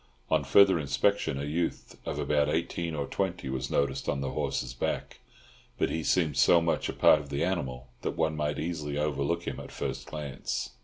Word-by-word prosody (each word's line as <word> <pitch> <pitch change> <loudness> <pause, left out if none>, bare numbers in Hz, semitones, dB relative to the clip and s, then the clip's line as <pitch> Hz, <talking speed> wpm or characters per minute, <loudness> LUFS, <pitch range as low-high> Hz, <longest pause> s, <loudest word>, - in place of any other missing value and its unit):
On 80 -2 +3
further 95 +6 +6
inspection, 75 +2 +1
a 70 - -3
youth 80 +4 -2
of - - -2
about 75 -1 +2
eighteen 85 +1 -1
or 70 -2 -1
twenty 90 -3 -2
was 65 -1 -3
noticed 70 -1 0
on 70 - 0
the 70 -1 -2
horse's 60 -1 -2
back, - - -3 0.6
but - - +1
he 80 - -2
seemed 80 -6 +2
so 85 - +6
much 85 0 0
a - - -2
part 75 - +6
of 70 -1 -9
the 70 +2 -1
animal 65 -9 -2
that - - -3
one 80 -1 +1
might 75 -1 -1
easily 75 -3 -3
overlook 75 +3 0
him 70 -6 -4
at - - -7
a - - -14
first - - -4
glance. 75 -3 -4
75 Hz, 200 wpm, -29 LUFS, 70-85 Hz, 0.6 s, further